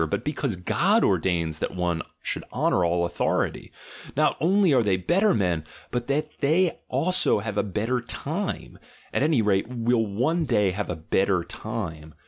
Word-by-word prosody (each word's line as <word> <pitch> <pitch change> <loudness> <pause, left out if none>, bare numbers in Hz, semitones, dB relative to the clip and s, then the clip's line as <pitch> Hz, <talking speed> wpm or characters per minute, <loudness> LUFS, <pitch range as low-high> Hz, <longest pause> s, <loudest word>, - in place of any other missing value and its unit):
But - - -2
because 140 -6 -2
God 90 0 +2
ordains 85 -4 +1
that - - -3
one 90 -2 0 0.2
should - - -3
honour 90 - +1
all 85 0 +1
authority) 85 0 -1 0.2
— - - -14
not - - +3
only 185 0 +4
are 130 - +5
they 100 -4 +2
better 190 - +2
men, 90 - +1 0.3
but 120 -1 -2
that 150 +2 -1
they 165 +5 +2
also 185 +2 +2
have 105 0 -4
a 105 - +2
'better 110 +5 -1
time,' 160 - -4 0.3
at - - +1
any 145 -6 +3
rate, 100 -1 +2
will 120 -2 +1
one 145 +12 0
day 105 -7 +2
have 100 +2 -4
a 90 - -2
'better 90 +3 +1
time.' 80 -6 -6
110 Hz, 170 wpm, -25 LUFS, 90-145 Hz, 0.3 s, are